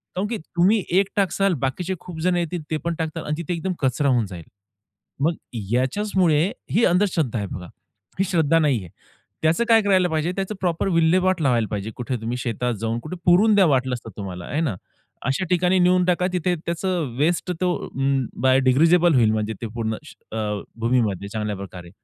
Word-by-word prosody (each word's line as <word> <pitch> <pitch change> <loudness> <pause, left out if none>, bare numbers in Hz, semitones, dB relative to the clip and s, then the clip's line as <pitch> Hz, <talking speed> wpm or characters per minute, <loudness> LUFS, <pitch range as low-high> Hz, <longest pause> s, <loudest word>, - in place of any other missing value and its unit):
कारण 190 +3 -1
की 230 +1 -3
तुम्ही 185 +5 +1 0.2
एक 195 - +1
टाकाल 195 -1 +2
बाकीचे 175 +8 -2
खूप 175 -3 -9
जण 180 +1 +2
येतील 175 0 -2
ते 155 - +1
पण 170 - 0
टाकतील 160 -1 -3
आणि 150 - -2
तिथे 170 +1 -3
एकदम 185 +3 -2
कचरा 135 +1 +1
होऊन 120 -4 +2
जाईल. 90 -4 -9 0.8
मग 160 +2 +2 0.4
याच्याचमुळे 170 - +2 0.2
ही 230 - +4
अंधश्रद्धा 175 - +1
आहे 100 - -3
बघा. 90 -1 -6 0.5
ही - - +4
श्रद्धा 165 -3 +3
नाहीये. 130 - 0 0.5
त्याचं 160 +8 +2
काय 225 -1 +7
करायला 190 -3 +3
पाहिजे 160 +1 0
त्याचं 195 +2 -3
प्रॉपर 175 -1 0
विल्हेवाट 180 +1 +3
लावायला 120 -6 +2
पाहिजे 105 +1 -4
कुठे 125 +1 -3
तुम्ही 115 +2 -3
शेतात 125 0 -2
जाऊन 115 +1 -1
कुठे 155 +8 -7
पुरून 195 +5 +5
द्या 195 -2 +6
वाटलंच 130 -3 +1
तर - - -7
तुम्हाला, 90 -3 -6
आहे 150 - -2
ना? 140 - -1 0.5
अशा 135 +8 0
ठिकाणी 180 +1 +3
नेऊन 180 0 +4
टाका 180 0 +2
तिथे 180 0 +1
त्याचं 170 -5 -2
वेस्ट 170 +5 +1
तो 180 -1 +2
अं, 135 -1 0 0.2
बायोडिग्रेडेबल 135 +7 +4
होईल 115 -4 +4
म्हणजे 110 0 -1
ते 115 - -3
पूर्ण 110 -2 -1
श 155 - -13 0.2
अ, 105 -2 -2 0.2
भूमीमध्ये 115 -5 0
चांगल्याप्रकारे. 100 -4 -5
155 Hz, 180 wpm, -23 LUFS, 120-180 Hz, 0.8 s, काय